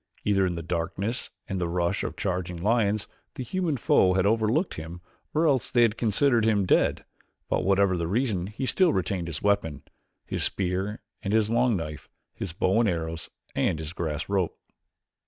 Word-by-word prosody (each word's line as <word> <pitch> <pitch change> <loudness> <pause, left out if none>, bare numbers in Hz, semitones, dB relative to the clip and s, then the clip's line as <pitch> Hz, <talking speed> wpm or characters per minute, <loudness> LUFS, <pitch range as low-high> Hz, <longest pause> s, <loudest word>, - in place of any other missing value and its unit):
Either 95 -2 +3
in 90 - -2
the 85 - -5
darkness 95 +7 -3 0.2
and 95 -2 -3
the 85 - 0
rush 85 +2 0
of - - -4
the - - -14
charging 90 -3 -2
lions 105 +2 +1 0.3
the 130 - -4
human 160 +3 -1
foe 90 -5 +4
had 95 0 +2
overlooked 115 - +2
him 80 +2 -7 0.4
or 160 +2 +3
else 135 -6 +2
they 120 -1 +4
had 115 -2 +3
considered 115 +2 +2
him 105 -3 +2
dead; - - +2 0.4
but - - +1
whatever 100 0 +3
the 85 -1 -2
reason 100 -3 0
he 110 +6 -4
still 180 +5 +3
retained 90 -2 -1
his 80 -4 -5
weapons 90 -9 +1 0.4
his - - -3
spear 95 +3 -1 0.2
and 100 - -2
his 110 -1 +2
long 120 -2 +3
knife, 75 -3 -6 0.2
his 95 - -5
bow 95 +5 +1
and 115 -3 +3
arrows, 80 -1 -3 0.3
and - - +1
his 80 +1 -6
grass 80 -2 -3
rope. 95 -4 0
100 Hz, 185 wpm, -27 LUFS, 85-115 Hz, 0.4 s, foe